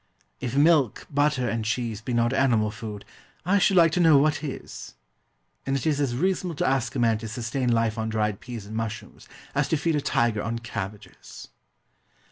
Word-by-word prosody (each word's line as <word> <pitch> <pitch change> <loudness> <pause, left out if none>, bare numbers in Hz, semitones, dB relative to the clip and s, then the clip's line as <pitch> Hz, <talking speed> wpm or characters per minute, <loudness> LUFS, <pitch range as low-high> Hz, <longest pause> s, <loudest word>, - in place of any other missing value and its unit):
If 125 +1 -4
milk, 145 -4 +3
butter, 145 -3 +1
and 115 -1 -1
cheese 115 -1 -2
be 125 - -5
not 120 +1 +1
animal 115 -6 +2
food 105 -1 -8 0.4
I 200 +3 +3
should 195 0 +3
like 165 -2 +6
to 180 - 0
know 160 -4 +6
what 150 +1 +2
is? 140 -4 -7 0.7
And 135 - -1
it 135 - -2
is 150 -2 +1
as 130 -4 0
reasonable 180 +3 -1
to - - 0
ask 130 -2 0
a - - -1
man 115 -2 +2
to 115 - -6
sustain 120 +3 -2
life 115 -1 +1
on 110 0 -2
dried 105 -2 -1
peas 115 -4 -8
and 110 +2 -8
mushrooms 115 -1 -6 0.3
as 140 0 +1
to 160 - +1
feed 165 +1 0
a 145 - 0
tiger 115 -5 +1
on 115 +2 -3
cabbages. 105 -3 -8
120 Hz, 195 wpm, -25 LUFS, 110-145 Hz, 0.7 s, like